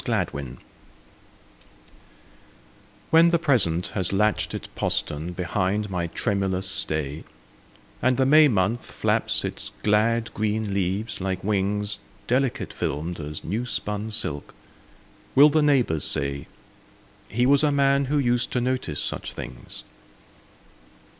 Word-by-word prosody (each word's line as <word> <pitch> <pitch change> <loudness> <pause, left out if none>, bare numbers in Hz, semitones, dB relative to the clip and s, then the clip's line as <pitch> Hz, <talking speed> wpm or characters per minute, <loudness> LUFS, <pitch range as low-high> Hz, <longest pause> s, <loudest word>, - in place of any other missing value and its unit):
AFTERWARDS 70 -4 -2 2.5
WHEN 165 +1 +7
the 170 - +3
Present 95 - +1
has 95 -3 -2
latched 105 +2 +1
its - - -6
postern 75 +4 -1
behind 95 +3 -1
my 90 -2 -1
tremulous 95 0 -1
stay, 80 -5 -2 0.8
And 130 -1 +2
the 135 - +3
May 155 +3 +7
month 110 0 0
flaps - - 0
its - - -6
glad 110 +2 +2
green 110 -1 -1
leaves 100 +3 -2
like 95 -1 -2
wings, 105 0 -1 0.3
Delicate 130 +1 0
filmed 80 +5 -3
as 75 0 -6
new 110 +8 -2
spun 105 -3 -2
silk, 75 -10 0 0.8
will 145 +3 +8
the 155 +1 +2
neighbours 125 - +2
say, 70 0 -1 0.8
"He 120 +3 +1
was 140 +2 +4
a 150 - +3
man 140 0 +3
who 145 +3 0
used 120 -3 +1
to 125 - +1
notice 125 - -1
such - - -2
things"? - - -6
105 Hz, 120 wpm, -24 LUFS, 90-125 Hz, 2.5 s, will